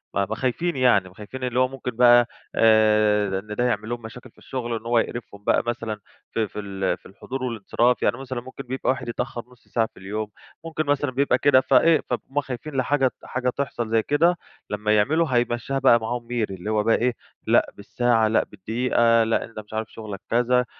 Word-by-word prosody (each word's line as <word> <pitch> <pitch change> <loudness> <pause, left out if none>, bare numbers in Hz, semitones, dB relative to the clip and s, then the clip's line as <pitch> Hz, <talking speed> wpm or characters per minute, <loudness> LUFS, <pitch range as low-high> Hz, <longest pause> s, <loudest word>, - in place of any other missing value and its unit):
أ 100 - +2
ما 110 - -4
خايفين 135 +9 -1
يعني. 120 -8 +3
ما 90 - -20
خايفين 120 +6 -8
اللي 125 0 0
هو 130 - +4
ممكن 130 -1 -5
بقى 120 0 +6 0.3
آآ 105 -3 +4
إن 105 +2 -8
ده 120 - 0
يعمل 110 -3 -1
لهم 120 0 -4
مشاكل 115 +2 -11
في - - -43
الشغل. 120 -3 -4
إن 110 - -22
هو 120 0 +3
يقرفهم 110 -3 -5
بقى - - +2
مثلًا 115 -2 -3 0.3
في 110 -1 0
في 105 - -8
ال 95 -2 -2
في - - -35
الحضور 130 +7 -7
والانصراف. 120 +1 0
يعني - - +2
مثلًا 130 -2 -5
ممكن 130 +2 -9
بيبقى 130 +1 -3
واحد 130 -2 -1
يتأخّر 120 0 -4
نُص 125 -2 -22
ساعة 115 -1 0
في - - -25
اليوم، 105 +3 -4 0.4
ممكن 160 -1 -2
مثلًا 145 -1 0
بيبقى 135 0 +2
كده 135 -1 +5
فإيه، 165 +4 +4
فهُم 135 +3 -2
خايفين 135 +2 -7
لحاجة 135 +1 +2
ت - - -9
حاجة 125 0 -1
تحصل 125 -3 -3
زي 110 0 +2
كده 170 +7 +3 0.3
لمّا 105 +1 +1
يعملوا 155 +11 +2
هيمشّيها 120 +2 0
بقى 130 -3 +5
معاهم 115 +1 -4
ميري. 115 -5 -2
اللي 95 +3 -6
هو 105 -1 +1
بقى 115 +1 +3
إيه، 125 0 0 0.3
لأ - - +3
بالساعة، 115 +2 +1
لأ 110 - +2
بالدقيقة، 115 +3 +1
لأ 115 0 0
أنت 115 -1 -10
مش 105 0 -12
عارف 110 0 -3
شغلك 105 -3 -7
كذا. 125 +1 +2
120 Hz, 210 wpm, -24 LUFS, 110-130 Hz, 0.4 s, بقى